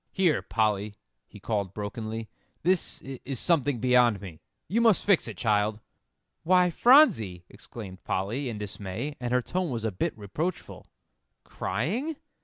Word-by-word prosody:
"Here, 180 -7 +2
Polly," 105 -2 0 0.3
he 105 - -13
called 100 -3 -2
brokenly, 110 +1 -5 0.4
"this 180 +1 +1
is 135 -1 -6
something 145 -6 +2
beyond 125 -3 +4
me. 90 -5 -10 0.3
You 230 +5 +1
must 225 -5 +4
fix 200 -4 +3
it, - - -7
child." 105 -1 +1 0.6
"Why, 180 0 +4
Phronsie!" 115 - +5
exclaimed 100 -3 -10
Polly, 115 +8 -2
in 110 - -5
dismay, 105 +7 -5
and 120 -1 -3
her 125 0 +2
tone 180 +3 -2
was 115 -4 -3
a 110 - 0
bit 95 - -2
reproachful. 155 - -5 0.6
"Crying? 205 - -2
120 Hz, 140 wpm, -27 LUFS, 105-165 Hz, 0.6 s, Phronsie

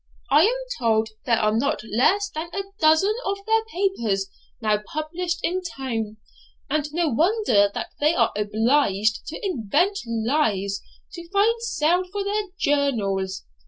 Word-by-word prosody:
'I 320 - +7
am 470 +4 +2 0.2
told 220 -2 +2 0.2
there 230 -2 +4
are 215 0 +2
not 260 0 0
less 265 - +2
than 315 +2 -5
a 395 - -1 0.2
dozen 315 +6 +4
of 395 +1 -1
their 445 0 +2
papers 290 - -1 0.3
now 215 -2 +1
published 335 +3 -2
in 370 +2 0
town, 235 - -4 0.5
and 300 0 0
no 335 +1 0
wonder 315 - +3
that - - -4
they 305 +3 +3
are 230 -1 +3
obliged 215 0 +1
to 315 - -6
invent 350 - +1
lies 220 -4 0 0.3
to 340 -1 -9
find 435 +4 +2
sale 355 -5 +1
for 405 0 -2
their 410 +2 0 0.2
journals. 200 -10 0
295 Hz, 145 wpm, -24 LUFS, 220-365 Hz, 0.5 s, I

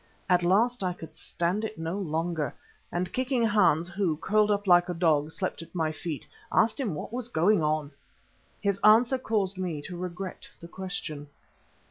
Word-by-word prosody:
At 180 -1 +4
last 215 +8 +2
I 180 -1 0
could 165 -2 -11
stand 175 +5 -2
it 220 0 -4
no 165 +2 -3
longer, 165 -5 -2 0.4
and 175 0 -2
kicking 255 -1 +1
Hans 185 -6 +3
who, 175 -4 0
curled 210 +5 +2
up 205 0 +1
like 175 -1 +5
a 175 - -2
dog, 155 -3 +2
slept 185 0 -3
at 165 - -13
my 160 -2 +1
feet, 155 -1 -5 0.3
asked 225 +5 +3
him 220 - -1
what 150 - -6
was 245 -1 -2
going 200 -2 +3
on. 150 -1 0 0.7
His 200 -1 0
answer 235 +5 +6
caused 200 -5 -1
me 175 -5 -2
to 180 - -7
regret 180 +1 -6
the 170 - -10
question. 170 -5 -6
180 Hz, 175 wpm, -28 LUFS, 165-210 Hz, 0.7 s, answer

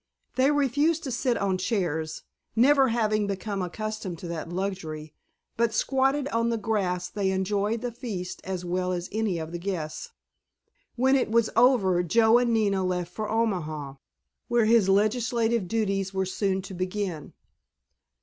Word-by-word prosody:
They 260 +2 +4
refused 290 +3 +2
to 265 - -4
sit 240 +1 0
on 190 -2 0
chairs, 165 -6 -2 0.3
never 270 +3 +5
having 215 -3 +1
become 200 0 -3
accustomed 215 0 -4
to 175 - -8
that 165 -1 -5
luxury, 175 -5 -4 0.4
but 230 -1 +1
squatted 270 +2 +1
on 230 -1 +1
the 230 - 0
grass 195 -5 -1
they 200 -1 -1
enjoyed 200 +4 0
the 245 -1 -3
feast 210 -7 -6
as 185 -1 -4
well 180 +1 -1
as 175 0 -4
any 215 -4 0
of 160 0 -5
the 175 - -5
guests. 175 - -4 0.9
When 265 +2 +3
it 260 - +1
was 230 0 +2
over 220 -7 +4
Joe 220 +7 +4
and 245 -1 +1
Nina 200 -4 +2
left 180 -1 -2
for 215 +1 -4
Omaha, 155 -11 -2 0.5
where 240 -2 +3
his 220 -3 +4
legislative 230 +1 +2
duties 195 -2 -1
were 190 0 +1
soon 190 0 -1
to 195 0 -8
begin. 185 -3 -4
205 Hz, 155 wpm, -26 LUFS, 180-230 Hz, 0.9 s, never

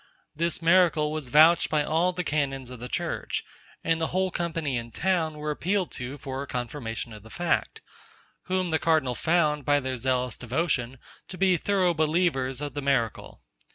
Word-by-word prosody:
This 170 +2 -1
miracle 165 -3 +4
was 155 -5 -4
vouched 155 +5 +6
by 155 -1 +2
all 165 +4 +2
the 180 0 -3
canons 135 -5 -2
of 125 - -9
the 125 +1 -7
church; - - -2 0.4
and 165 0 +1
the 160 - +1
whole 185 +1 0
company 165 -6 -2
in 120 -1 -4
town 165 +3 0
were 150 0 -3
appealed 185 +4 -1
to 125 +3 -6
for 135 0 -5
a 140 - -6
confirmation 120 -2 -4
of 105 - -10
the 110 - -14
fact; 175 +6 -1 0.6
whom 185 -2 -1
the 160 - +2
cardinal 155 -6 +2
found, 150 0 +1
by 145 +1 +3
their 130 -2 -3
zealous 125 0 0
devotion, 130 -1 -1 0.3
to 185 - -8
be 185 -1 +4
thorough 185 0 +2
believers 155 -5 +1
of 145 -2 -4
the 145 - -3
miracle. 135 -6 -1
150 Hz, 180 wpm, -27 LUFS, 130-170 Hz, 0.6 s, vouched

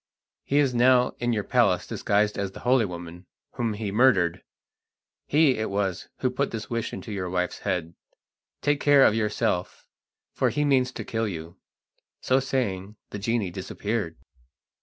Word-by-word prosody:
He 140 - 0
is 140 -3 +3
now 125 +1 +4
in 120 0 0
your 110 -3 0
palace - - +2
disguised 105 +1 0
as 100 -1 -3
the - - -10
holy 125 -1 +3
woman 85 -1 -8 0.2
whom 115 -2 -2
he 105 -1 -4
murdered. 95 -7 +3 0.9
He 145 -5 +3
it 110 - -1
was 95 -2 -2
who 130 - +1
put 140 +2 -1
that 115 0 -6
wish 115 -1 -2
into 110 - -7
your 95 -3 -3
wife's 90 0 -2
head. 85 -1 -2 0.7
Take 145 0 +2
care 145 -2 +6
of - - +5
yourself, 105 -5 -1 0.5
for - - +1
he 150 0 0
means 130 -3 +3
to - - -6
kill 110 -1 -1
you." 85 -1 -7 0.6
So 130 +1 +2
saying 105 -7 -2 0.2
the 100 - -5
genie 105 -2 -1
disappeared. 95 -1 -3
110 Hz, 160 wpm, -26 LUFS, 95-125 Hz, 0.9 s, care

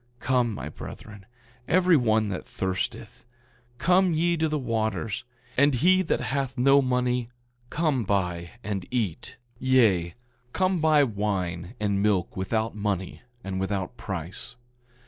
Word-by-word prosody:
9:50 - - -34
Come, 125 -3 +1
my - - -5
brethren, 105 -2 -10 0.4
every 180 0 +4
one 110 -5 +2
that 90 - -5
thirsteth, 115 +1 -4 0.5
come 180 +4 +3
ye 170 +2 +2
to 160 -1 0
the 155 - 0
waters; 115 -3 -2 0.3
and 140 0 +4
he 185 +9 +4
that 180 - 0
hath 135 -1 -2
no 135 +3 +5
money, 125 -2 0 0.4
come 150 -6 0
buy 90 -4 -1
and 100 -3 -3
eat; 110 -10 -3 0.2
yea, 110 -10 +3 0.4
come 185 -1 +1
buy 155 -2 +5
wine 100 -4 -2
and 100 -2 0
milk 100 -4 +1
without 110 +4 -1
money 100 -3 -3 0.2
and 95 -1 -3
without 95 +3 -2
price. 95 +5 -5
115 Hz, 135 wpm, -26 LUFS, 100-135 Hz, 0.5 s, no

